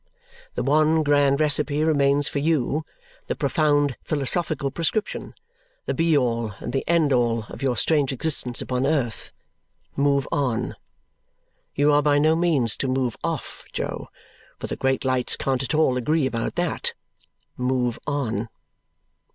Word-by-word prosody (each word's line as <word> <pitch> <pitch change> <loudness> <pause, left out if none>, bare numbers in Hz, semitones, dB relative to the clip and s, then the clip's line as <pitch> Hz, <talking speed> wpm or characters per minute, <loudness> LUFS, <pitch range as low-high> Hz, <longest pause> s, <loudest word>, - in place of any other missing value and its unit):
The - - -1
one 155 +2 +3
grand 145 -1 +3
recipe 150 0 +2
remains 145 -2 +2
for 140 - -2
you 155 0 0 0.4
the - - -2
profound 145 -4 +1
philosophical 150 -1 0
prescription 170 +8 -2 0.5
the - - -1
be 165 -2 +2
all 115 -5 -1
and 120 - -6
the 135 - 0
end 165 -4 +3
all 115 -2 +1
of - - -9
your 130 -3 0
strange 145 +1 +2
existence 130 -3 0
upon 130 +1 -1
earth. 135 -8 -1 0.6
Move 140 -1 +1
on! 125 -5 -1 1.0
You 145 +1 +3
are 145 - +4
by 145 0 +3
no 155 +2 +3
means 150 -10 +2
to 135 - -2
move 130 -3 -1
off, - - -4
Jo, - - -4 0.5
for - - -6
the - - -4
great 135 0 0
lights 130 -1 +2
can't 135 -1 -1
at 135 +3 -2
all 150 -5 +3
agree 150 +4 +1
about 115 -3 -2
that. 175 -2 -1 0.6
Move 125 -2 -1
on! 120 -6 -2
140 Hz, 145 wpm, -23 LUFS, 125-155 Hz, 1.0 s, are